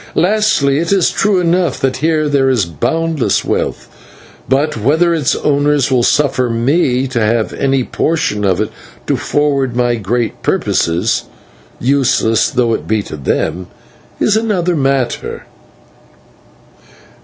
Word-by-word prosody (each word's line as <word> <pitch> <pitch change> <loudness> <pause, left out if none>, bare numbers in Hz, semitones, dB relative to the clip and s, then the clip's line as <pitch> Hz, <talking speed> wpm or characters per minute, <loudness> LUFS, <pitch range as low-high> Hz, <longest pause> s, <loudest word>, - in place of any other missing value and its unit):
Lastly, 180 -8 +2
it 170 +2 -2
is 195 -3 +3
true 200 -2 +1
enough 175 -3 0
that 135 -1 -1
here 155 +1 +1
there 140 -2 +2
is 120 -8 +1
boundless 145 - -1
wealth; - - -2 0.6
but 140 +4 +1
whether 155 +10 +2
its 150 -3 0
owners 145 -2 +1
will 125 -2 +3
suffer 130 -1 +1
me 125 +2 +1
to 130 -2 -2
have 110 0 0
any 135 -1 0
portion 155 -8 -1
of 95 -2 +1
it, 110 - -2 0.3
to - - 0
forward 140 -4 0
my 120 -1 +1
great 115 +2 -2
purposes 85 +7 0 0.5
useless 125 -4 +2
though 125 -4 +1
it - - -4
be 110 -1 0
to - - -8
them 80 +5 -2 0.5
is 215 - +2
another 195 -6 0
matter." 135 -4 -1
135 Hz, 130 wpm, -15 LUFS, 115-160 Hz, 0.6 s, is